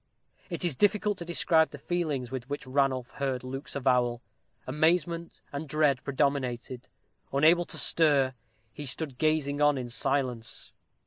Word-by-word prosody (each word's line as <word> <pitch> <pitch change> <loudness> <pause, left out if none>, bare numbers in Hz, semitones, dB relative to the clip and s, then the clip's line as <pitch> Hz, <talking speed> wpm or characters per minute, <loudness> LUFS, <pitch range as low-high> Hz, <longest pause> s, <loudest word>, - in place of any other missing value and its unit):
It 175 0 -1
is 170 - 0
difficult 205 +3 +2
to 170 - -6
describe 165 -1 +3
the 145 - -9
feelings 145 -6 -2
with 130 -1 -5
which 145 0 -4
Ranulph 130 -1 0
heard 135 -3 -2
Luke's 135 +2 -6
avowal. 125 -3 +1 0.4
Amazement 165 +4 0
and 145 +1 -5
dread 145 -3 +2
predominated. 130 -3 -1 0.4
Unable 160 +5 +4
to - - -8
stir, 140 -5 +3 0.4
he 145 - -7
stood 135 -1 -3
gazing 150 -2 +1
on 145 -1 +4
in 125 -2 -4
silence. 120 -2 -2
140 Hz, 140 wpm, -28 LUFS, 130-160 Hz, 0.4 s, Unable